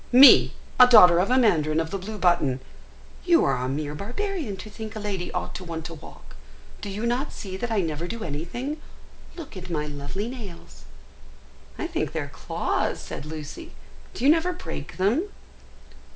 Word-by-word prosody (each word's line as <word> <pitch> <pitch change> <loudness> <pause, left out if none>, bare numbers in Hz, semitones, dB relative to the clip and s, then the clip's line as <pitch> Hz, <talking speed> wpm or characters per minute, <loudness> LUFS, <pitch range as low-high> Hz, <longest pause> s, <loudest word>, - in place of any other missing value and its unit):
Me, 260 +3 +9 0.3
a 250 - +10
daughter 180 -8 +8
of 190 - +1
a 255 - +4
mandarin 160 -10 +3
of 160 0 -2
the 195 - -1
blue 215 +3 -6
button! 170 -9 +2 0.6
You 345 -2 +4
are - - +1
a 125 +1 -2
mere 145 +2 -3
barbarian 245 - -4
to 215 - -9
think 220 +1 -8
a - - -4
lady 195 -4 -3
ought - - -4
to 185 - -7
want 165 -2 -6
to 165 - -6
walk. 155 - -13 0.5
Do 205 - -5
you 205 +4 -4
not 245 +5 -1
see 190 -2 -7
that 240 +4 -3
I 220 -3 +1
never 165 0 -3
do 230 +3 -5
anything? 240 - -4 0.5
Look 320 - -9
at 185 -1 -8
my 150 -3 -2
lovely 150 +8 -5
nails." 180 - -10 0.9
"I - - -3
think - - -2
they - - -1
are - - -5
claws," - - -2
said 150 - -7
Lucy; 160 - -8 0.4
"do - - -5
you 290 - +8
never 335 +3 +2
break 360 - -7
them?" 235 - +1
195 Hz, 185 wpm, -25 LUFS, 160-245 Hz, 0.9 s, a